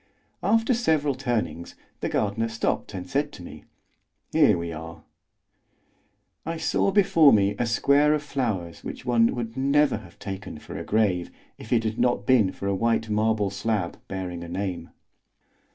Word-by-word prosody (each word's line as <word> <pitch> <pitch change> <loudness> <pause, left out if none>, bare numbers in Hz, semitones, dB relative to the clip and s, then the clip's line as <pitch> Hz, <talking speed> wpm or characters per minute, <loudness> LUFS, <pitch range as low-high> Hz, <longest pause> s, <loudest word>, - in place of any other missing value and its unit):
After 225 +4 +2
several 155 - +1
turnings, 120 -9 -3 0.2
the - - -2
gardener 110 +2 0
stopped 115 -2 -2
and 90 -1 -6
said 145 +1 -1
to 90 - -10
me: 75 -3 -11 0.7
"Here - - +4
we 85 0 -4
are." 80 +2 -9 1.4
I 165 +1 -4
saw 160 +4 +1
before 180 -7 +5
me 100 -1 +3
a 120 - +1
square 140 +5 +3
of 150 - -3
flowers 110 - -3
which - - -7
one 115 -2 +3
would 115 -1 -4
never 140 0 +2
have 95 -5 -14
taken 95 -4 -7
for - - -10
a - - -4
grave, 100 -5 +1 0.3
if 110 - -11
it 115 -2 +3
had 110 0 -3
not 120 -5 +1
been 110 -6 +4
for - - -8
a 100 - +1
white 115 +2 0
marble 105 -1 +1
slab 100 -3 -2
bearing 90 -2 -5
a - - -7
name. 90 -2 -4
110 Hz, 165 wpm, -25 LUFS, 95-135 Hz, 1.4 s, before